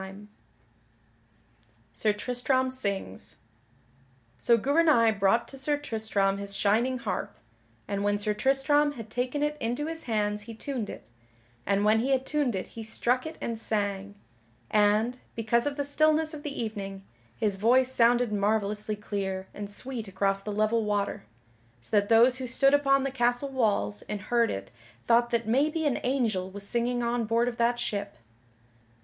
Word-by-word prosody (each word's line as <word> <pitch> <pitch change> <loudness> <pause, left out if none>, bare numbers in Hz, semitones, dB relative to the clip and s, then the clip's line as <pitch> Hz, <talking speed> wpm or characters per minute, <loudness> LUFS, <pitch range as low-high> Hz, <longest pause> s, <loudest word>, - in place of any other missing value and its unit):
[Sidenote: 195 +2 -10 1.7
Sir 210 - +1
Tristram 250 +4 0
sings] 200 - -4 1.0
So 235 - +4
Gouvernail 280 -2 +4
brought 210 +3 +2
to 270 - -8
Sir 290 +2 +1
Tristram 215 -7 -1
his 200 0 -6
shining 230 +7 +2
harp, 240 - -4 0.5
and 200 0 -2
when 205 0 +1
Sir 210 +1 -1
Tristram 275 +5 +2
had 225 -5 -9
taken 255 +5 -1
it 295 0 0
into 245 +5 -2
his 325 +1 -4
hands 210 -3 -1
he 225 +2 -9
tuned 245 -3 -4
it, - - -10 0.6
and 200 +1 +2
when 215 +1 +4
he 250 +4 -1
had 265 -1 +1
tuned 290 -7 0
it 185 - -4
he 225 - -9
struck 245 +5 -1
it 315 - -8
and 230 -1 -4
sang; 205 -2 -2 0.6
and, 215 +4 +2 0.2
because 235 +3 +1
of 285 0 -3
the 285 - 0
stillness 310 +2 +2
of 300 - -7
the 290 -1 -5
evening, 200 -4 -5 0.3
his 205 - 0
voice 250 +5 +3
sounded 240 -2 +3
marvellously 210 +1 0
clear 195 -2 -4
and 205 -1 -6
sweet 235 +1 -6
across 195 +1 0
the 210 - -5
level 215 +2 +1
water, 205 - -2 0.5
so 120 - -5
that 205 0 +3
those 240 +3 +5
who 255 - -4
stood 275 +3 +3
upon 275 -1 +4
the 275 - -2
castle 245 +1 0
walls 205 - 0
and 210 - -3
heard 235 +3 +1
it 95 0 -5 0.3
thought 235 0 +4
that 235 -2 -1
maybe 300 +7 +1
an 285 -4 +1
angel 225 -8 0
was 200 +1 -9
singing 240 +1 0
on 235 0 0
board 230 +2 +1
of 240 -1 -3
that 240 +1 +1
ship. 205 -4 -3
230 Hz, 165 wpm, -28 LUFS, 205-260 Hz, 1.7 s, those